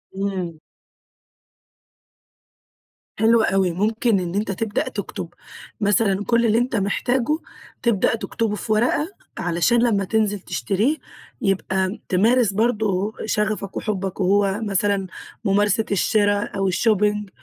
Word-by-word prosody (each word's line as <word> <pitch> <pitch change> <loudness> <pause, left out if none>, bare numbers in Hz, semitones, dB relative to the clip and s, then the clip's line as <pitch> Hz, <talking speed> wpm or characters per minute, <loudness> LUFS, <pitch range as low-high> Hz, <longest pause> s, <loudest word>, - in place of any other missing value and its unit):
امم. 185 -5 -3 2.6
حلو 225 +1 +5
أوي، 190 -3 +2
ممكن 215 +4 +1
إن 175 0 -4
أنت 205 0 -1
تبدأ 205 +2 -2
تكتب - - -5 0.5
مثلًا 205 -1 +2
كل 235 0 +2
اللي 220 0 +3
أنت 245 +1 0
محتاجه، 245 +7 0 0.4
تبدأ 230 -2 +2
تكتبه 225 -1 -2
في 215 - -5
ورقة 240 +8 +2 0.3
علشان 180 +8 +2
لما 210 -5 +2
تنزل 205 0 0
تشتريه 210 +9 -1 0.4
يبقى 190 0 0
تمارس 220 +3 +3
برضو 215 -2 0
شغفك 210 -2 -1
وحبك، 195 -3 -3
وهو 195 +1 +2
مثلًا 200 -2 0 0.4
ممارسة 205 +2 +2
الشرا 205 +1 +2
أو 195 -1 -1
الShopping، 210 0 +1
205 Hz, 110 wpm, -22 LUFS, 195-225 Hz, 2.6 s, حلو